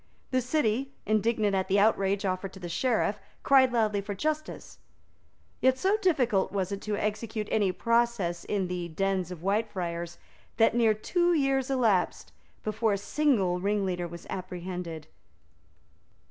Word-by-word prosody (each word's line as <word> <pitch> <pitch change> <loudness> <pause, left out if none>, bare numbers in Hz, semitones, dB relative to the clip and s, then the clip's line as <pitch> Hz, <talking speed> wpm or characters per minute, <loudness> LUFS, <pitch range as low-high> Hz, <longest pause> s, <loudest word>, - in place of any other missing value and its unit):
The 255 0 +2
City, 260 0 0
indignant 215 -1 +1
at 190 -1 0
the 195 +1 +2
outrage 200 -1 +2
offered 185 0 -2
to 190 - -11
the 175 - -6
Sheriff, 220 +1 0 0.2
cried 265 -2 +5
loudly 215 -4 +1
for 200 0 -5
justice. 310 +7 -4 0.8
Yet, 260 0 +3
so 385 +9 +2
difficult 265 - +1
was 195 -1 -2
it 200 - -4
to 210 -1 -2
execute 215 0 -3
any 205 -4 +2
process 230 -6 0
in 195 -3 -1
the 180 -1 -3
dens 190 +1 -1
of 180 -3 -8
Whitefriars, 180 -5 -2 0.4
that 225 - +4
near 225 -2 +3
two 345 - +1
years 270 -2 +1
elapsed 225 -9 +1 0.3
before 215 0 0
a - - 0
single 200 -7 +1
ringleader 190 -3 -1
was 170 0 -10
apprehended. 180 -3 -6
205 Hz, 145 wpm, -28 LUFS, 185-240 Hz, 0.8 s, cried